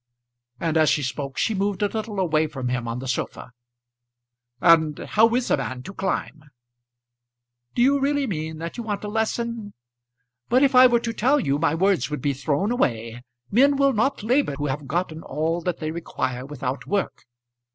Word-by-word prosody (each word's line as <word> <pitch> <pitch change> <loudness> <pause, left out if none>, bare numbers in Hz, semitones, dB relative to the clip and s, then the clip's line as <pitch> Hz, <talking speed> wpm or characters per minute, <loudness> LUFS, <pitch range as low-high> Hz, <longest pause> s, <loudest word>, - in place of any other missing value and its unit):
And 165 -1 0
as 155 -1 +4
she 150 - +1
spoke, 135 +1 -4
she 220 - +1
moved 200 0 -1
a - - +4
little 215 -1 -4
away 160 -4 +2
from 130 -4 -4
him 125 -1 -2
on 115 +1 -3
the 130 +1 -6
sofa. 125 0 -4 1.1
"And 160 -2 +4
how 225 +2 +3
is 250 -1 0
a - - +4
man 125 +3 -5
to 195 - -8
climb?" 160 -5 -3 1.3
"Do 240 - +3
you 280 +2 +4
really 285 +1 +1
mean 160 -7 -4
that 165 +5 -6
you 235 - -4
want 210 -2 -3
a - - -3
lesson? 220 0 -2 0.7
But 255 +3 +4
if 275 -1 +3
I 255 0 +9
were 240 -1 +2
to 230 -1 -3
tell 265 +7 +2
you, 140 - 0
my 160 -1 +2
words 175 -7 +2
would 150 -3 -4
be 145 - +1
thrown 145 - -1
away. 115 - -1 0.3
Men 275 +6 +5
will 275 0 +3
not 250 +3 0
labour 245 - +1
who 145 +1 -3
have 145 0 -3
gotten 160 +1 -2
all 160 +4 -2
that 175 0 -2
they 155 0 -3
require 130 -6 -4
without 135 -1 -4
work. 200 -9 -2
170 Hz, 190 wpm, -24 LUFS, 145-225 Hz, 1.3 s, I